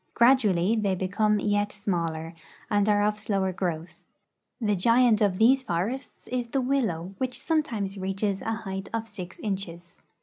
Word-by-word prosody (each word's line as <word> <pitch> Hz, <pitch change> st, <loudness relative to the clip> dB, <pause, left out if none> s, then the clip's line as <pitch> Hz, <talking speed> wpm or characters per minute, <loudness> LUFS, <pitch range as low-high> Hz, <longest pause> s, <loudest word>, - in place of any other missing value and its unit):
Gradually 225 Hz, -6 st, +4 dB
they 205 Hz, -4 st, +1 dB
become 210 Hz, +3 st, +1 dB
yet 205 Hz, 0 st, +1 dB
smaller 170 Hz, -5 st, -2 dB, 0.4 s
and 205 Hz, 0 st, +3 dB
are 205 Hz, 0 st, +4 dB
of 210 Hz, 0 st, +1 dB
slower 195 Hz, -3 st, 0 dB
growth. 170 Hz, -2 st, -4 dB, 0.6 s
The 210 Hz, -4 st, +1 dB
giant 230 Hz, +3 st, +4 dB
of 200 Hz, -3 st, +2 dB
these 255 Hz, +5 st, +5 dB
forests 230 Hz, +6 st, -3 dB
is 245 Hz, -1 st, -2 dB
the 270 Hz, +4 st, -1 dB
willow, 225 Hz, -10 st, -1 dB
which 255 Hz, -1 st, -2 dB
sometimes 225 Hz, -, -1 dB
reaches 195 Hz, +1 st, -1 dB
6 -, -, -7 dB
RUSSIA -, -, +1 dB
IN -, -, +1 dB
EUROPE 225 Hz, 0 st, -6 dB
a -, -, -4 dB
height 195 Hz, +1 st, -5 dB
of -, -, -14 dB
6 185 Hz, -4 st, -9 dB
inches. 175 Hz, -4 st, -5 dB
205 Hz, 175 wpm, -27 LUFS, 185-230 Hz, 0.6 s, these